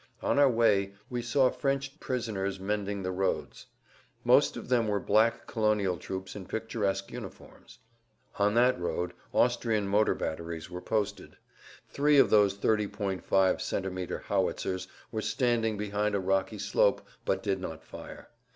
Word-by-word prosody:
On - - +2
our 140 -1 +6
way 105 -5 +2 0.2
we 120 -1 -1
saw 130 +1 +3
French 135 +1 -2
prisoners 100 -6 -2
mending 100 0 -2
the 95 - -2
roads. 95 +1 -2 0.6
Most - - +4
of - - -7
them 120 -3 +2
were 105 -1 +1
black 110 +3 +2
colonial 105 -4 +1
troops 95 0 -6
in 95 -3 -8
picturesque 100 -3 -2
uniforms. - - -10 0.6
On 105 +1 +3
that 125 -3 +4
road 90 0 -2 0.2
Austrian 115 -4 +2
motor 105 +2 +3
batteries 80 +1 -5
were 90 0 -6
posted. 105 0 -2 0.5
Three 145 +1 +3
of 135 - +6
those 100 -2 +4
30.5 100 -3 0
cm. 95 -1 0
howitzers 95 0 -1 0.2
were 110 -2 -2
standing 115 -3 +1
behind 105 0 -1
a - - +1
rocky 95 0 0
slope, - - +2 0.2
but - - -1
did - - 0
not - - -6
fire. - - -10
105 Hz, 140 wpm, -29 LUFS, 95-115 Hz, 0.6 s, our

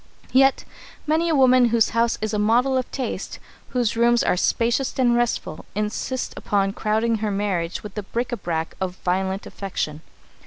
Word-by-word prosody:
Yet 270 +1 +4 0.4
many 320 +2 +1
a 320 - +2
woman 255 -2 +5
whose 230 -1 +3
house 230 0 +1
is 215 0 -2
a 210 - 0
model 240 +5 +3
of 255 -1 -1
taste, 265 - -4 0.3
whose 245 -4 0
rooms 235 +1 +3
are - - +2
spacious 235 +7 0
and 245 -2 +3
restful, 240 -1 -1
insists 215 +5 -2
upon 195 -1 0
crowding 220 +2 0
her 215 0 -2
marriage 195 -4 -2
with 210 -2 -8
the 210 - -4
bric 235 +5 -3
à 240 -5 -4
brac 165 -2 -2
of 185 -1 -2
violent 190 +2 -1
affection. 160 -6 -4
225 Hz, 170 wpm, -23 LUFS, 195-250 Hz, 0.4 s, woman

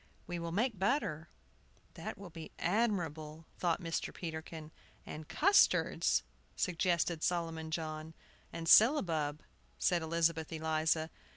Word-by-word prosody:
We 175 -1 -4
will 170 0 -4
make 215 +2 0
butter." 190 - 0 0.6
"That - - -6
will 195 -3 -10
be 160 -1 -8
admirable," 165 -7 -1
thought 170 -2 +1
Mr. 165 -1 -2
Peterkin. 160 -1 -7 0.3
"And 155 0 -8
custards," 395 +5 +3 0.3
suggested 170 -2 0
Solomon 165 -2 -1
John. 155 0 -4 0.4
"And 165 0 -5
syllabub," 165 - +5 0.3
said 175 -1 +2
Elizabeth 160 -1 0
Eliza. 160 0 0
165 Hz, 110 wpm, -34 LUFS, 160-175 Hz, 0.6 s, syllabub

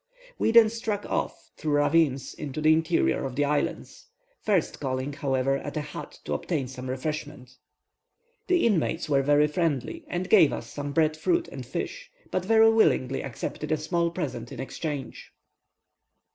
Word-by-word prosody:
We - - +2
then 225 -1 +7
struck 215 -2 -3
off, - - -3
through 155 -2 -1
ravines, 145 -2 +2
into 145 0 -6
the 155 +1 +5
interior 165 +1 +1
of 130 -2 -4
the 145 +1 +2
island, 145 0 -1 0.5
first 195 -6 0
calling, 130 +1 -2
however, 135 -1 0
at 145 - -6
a - - 0
hut - - -8
to 75 - -2
obtain 135 - -2
some 130 0 -7
refreshment. 130 -2 -5 1.0
The 360 -1 +3
inmates 170 -6 +1
were 140 -2 +3
very 145 +2 +4
friendly, 160 - -1
and 180 -4 -3
gave 155 - +6
us - - -6
some 145 0 -4
bread 155 +1 +2
fruit 345 - 0
and - - -7
fish, - - -5 0.2
but 185 - 0
very 225 +2 +5
willingly 135 - +2
accepted 135 +4 -5
a 155 - +3
small 170 +2 0
present 140 -9 -5
in - - -8
exchange. 140 0 -5
150 Hz, 160 wpm, -27 LUFS, 135-175 Hz, 1.0 s, then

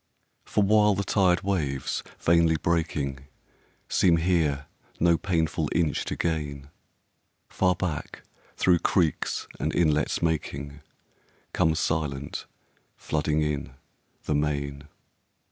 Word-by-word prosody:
For 105 - +1
while 105 0 +4
the 100 - -1
tired 95 -2 +2
waves, 75 -9 -1 0.2
vainly 85 -1 +3
breaking, 75 -5 -1 0.6
Seem 85 -3 +3
here 80 -5 +1 0.3
no 85 0 +4
painful 80 -3 0
inch 80 -4 +1
to - - -3
gain, 75 -4 -3 0.8
Far 90 -1 +2
back, 85 -4 -4 0.3
through 90 -2 +4
creeks 85 -3 0
and - - -1
inlets 75 -1 +1
making, 75 -3 -2 0.7
Comes 80 -1 +2
silent, 70 -4 -2 0.5
flooding 75 0 0
in, 70 -4 -3 0.5
the - - -1
main. 70 -1 -1
80 Hz, 105 wpm, -26 LUFS, 70-85 Hz, 0.8 s, while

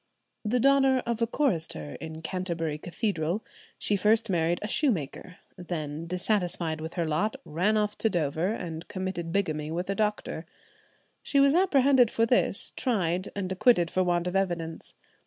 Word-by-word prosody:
The 235 +3 +1
daughter 270 0 +4
of 235 -1 -2
a 230 - +3
chorister 165 - -1
in 160 0 -7
Canterbury 165 -4 -2
Cathedral, 175 +1 -2 0.3
she 205 - 0
first 215 +2 +3
married 170 0 +1
a - - -2
shoemaker; 185 - 0 0.2
then, 165 -3 -5
dissatisfied 180 -3 -1
with 160 +1 -6
her 170 -2 0
lot, 160 - 0
ran 185 +8 +1
off 210 0 0
to 225 - +3
Dover 160 -1 0
and 170 -6 -5
committed 185 -3 -4
bigamy 155 -6 -1
with 175 +4 -2
a - - -1
doctor. 210 -6 -2 0.7
She 280 - +1
was 275 0 +5
apprehended 275 - +4
for 230 - +2
this, 230 -4 +1
tried, 185 -7 0
and 190 -2 -3
acquitted 185 -3 +3
for 185 - +2
want 175 -1 +1
of 180 +1 -3
evidence. 170 -4 -2
185 Hz, 155 wpm, -28 LUFS, 165-220 Hz, 0.7 s, was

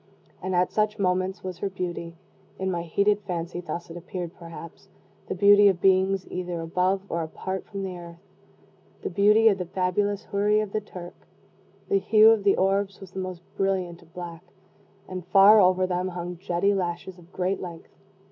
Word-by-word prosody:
And 185 0 -2
at 180 0 +2
such 215 0 0
moments 185 0 0
was 185 -2 -6
her 200 - -2
beauty 175 -3 -5 0.4
in 190 0 -2
my 170 -1 -2
heated 200 +5 +1
fancy 175 -1 -4
thus 170 0 -6
it - - -9
appeared 175 0 -6
perhaps 165 0 -11 0.4
the - - -3
beauty 205 +2 +7
of 190 -3 +2
beings 190 0 +3
either 180 -1 -4
above 180 +4 0
or 170 - -2
apart 190 +4 -5
from 200 -1 -5
the 185 -1 -4
earth 170 -1 -11 0.8
the - - -3
beauty 210 +4 +5
of 200 -3 +4
the 180 - -2
fabulous 190 +3 -1
Houri 210 +1 +1
of 215 -2 -3
the 215 - -1
Turk. 180 -4 -11 0.6
The 400 -1 +2
hue 220 - +6
of 220 -3 +2
the 200 - +3
orbs 195 +1 +1
was 195 -2 -11
the 190 - -6
most 185 -2 -6
brilliant 185 -3 -1
of 170 -1 -21
black, 175 -2 -8 0.6
and, 185 -1 -6
far 205 +3 +7
over 185 0 +4
them, 180 0 -1
hung 180 -1 -5
jetty 185 +2 +1
lashes 180 -1 -3
of 175 +1 -18
great 185 +1 -1
length. 170 -3 -9
185 Hz, 185 wpm, -26 LUFS, 175-200 Hz, 0.8 s, beauty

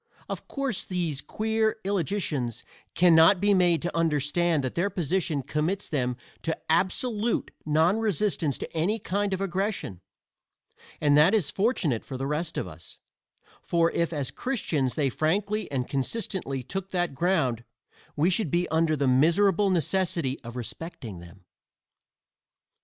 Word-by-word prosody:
Of - - -6
course 275 -7 -2
these 170 -6 -2
queer 220 0 0
illogicians 170 - -1 0.3
can 175 -1 +5
not 165 +4 +7
be 205 +2 +3
made 175 -3 +3
to 175 - -3
understand 160 0 +1
that 130 - -2
their 180 +4 0
position 165 -5 -1
commits 160 +9 -1
them 125 -5 -1 0.2
to 165 - -2
absolute 215 +6 +1 0.2
non 160 +7 +3
resistance 200 - 0
to - - -7
any 180 +8 +1
kind 200 -1 -1
of 190 0 -2
aggression; 190 - -2 1.0
and 145 -1 +4
that 165 +8 +6
is 185 -10 +1
fortunate 190 - 0
for 130 - -6
the 135 - -3
rest 155 +3 -2
of - - -2
us, 85 -1 -12 0.6
for 170 -1 +2
if 170 0 0
as 145 -6 -2
Christians 155 - -1
they 140 -3 +1
frankly 200 - 0
and 130 -3 -1
consistently 140 - -2
took 195 +8 -5
that 175 -5 -1
ground 135 -7 +1 0.5
we 160 +5 +2
should 185 -2 +1
be 175 +4 +1
under 160 0 +2
the 140 -1 0
miserable 170 +9 +4
necessity 170 -5 0
of 120 +1 -8
respecting 120 - -7
them. 85 +2 -14
170 Hz, 145 wpm, -27 LUFS, 140-195 Hz, 1.0 s, not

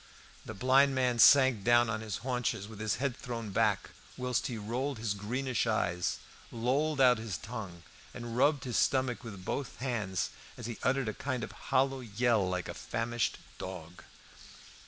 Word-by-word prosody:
The 110 - -6
blind 135 +5 +4
man 125 -2 +1
sank 130 -5 +7
down 120 +1 +5
on 110 -1 -2
his 110 -3 -4
haunches, 125 -5 -1
with 110 -1 -11
his 110 -1 0
head 135 -1 -1
thrown 115 -4 -5
back, 105 -2 +1 0.3
whilst 125 -1 -1
he 120 - -4
rolled 120 +6 -2
his 110 -2 -1
greenish 120 +4 -1
eyes, 90 -5 0 0.3
lolled 135 +6 0
out 125 -3 +6
his 110 -4 -4
tongue, 100 -7 -7 0.3
and 120 -1 -6
rubbed 145 +2 +3
his 125 -3 -2
stomach 130 -2 +1
with 100 -5 -9
both 140 -2 -3
hands 110 -8 -2 0.3
as 120 - -7
he 115 -1 -5
uttered 130 -1 +1
a 110 - -1
kind 130 -1 -3
of - - -5 0.2
hollow 135 0 +2
yell 115 -3 +1
like 90 -1 -2
a - - -5
famished 115 0 -2 0.2
dog. 90 -2 -7
120 Hz, 170 wpm, -31 LUFS, 105-130 Hz, 0.3 s, sank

